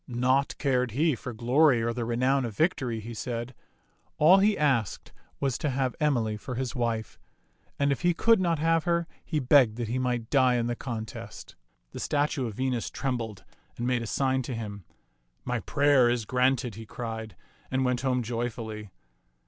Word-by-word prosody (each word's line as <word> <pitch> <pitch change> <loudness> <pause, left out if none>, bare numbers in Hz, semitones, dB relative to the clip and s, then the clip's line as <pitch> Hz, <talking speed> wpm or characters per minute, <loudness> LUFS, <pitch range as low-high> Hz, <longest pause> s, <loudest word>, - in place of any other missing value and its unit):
Naught 130 +3 +1
cared 125 -5 0
he 160 +1 +3
for 125 +1 -6
glory 125 +4 +3
or 115 0 0
the 120 -1 -3
renown 130 +4 +1
of 115 -4 -5
victory, 130 -9 0
he 115 +2 -7
said; 120 +2 -4 0.6
all 175 +6 +7
he 205 +1 +3
asked 130 - 0 0.3
was 135 -3 -1
to 150 - -1
have 130 -1 -1
Emily 120 -8 +1
for 125 +4 -6
his 130 -1 -3
wife; 115 -3 -2 0.6
and 140 0 +2
if 140 - -1
he 175 - +3
could 225 +5 +4
not 170 -2 +1
have 165 +2 +1
her, 170 -1 +1 0.2
he 155 - -1
begged 125 -4 +5
that 120 -3 -3
he 125 +2 -1
might 125 -3 -2
die 130 -3 +4
in 120 -1 0
the 120 0 -1
contest. 110 -3 -7 0.4
The - - -7
statue 145 -3 0
of 110 - -7
Venus 130 -2 -1
trembled 115 -6 -4 0.3
and 120 - -3
made 125 -1 +1
a 115 - -5
sign 130 +3 +1
to 125 0 -5
him. 105 -4 -6 0.3
" - - -45
My - - -1
prayer 140 -4 +3
is 120 -2 0
granted," 125 -1 +1
he 110 +2 -10
cried, 110 -2 -6 0.3
and 130 0 0
went 125 -1 0
home 125 -2 0
joyfully. 115 -2 -4
125 Hz, 185 wpm, -27 LUFS, 115-140 Hz, 0.6 s, all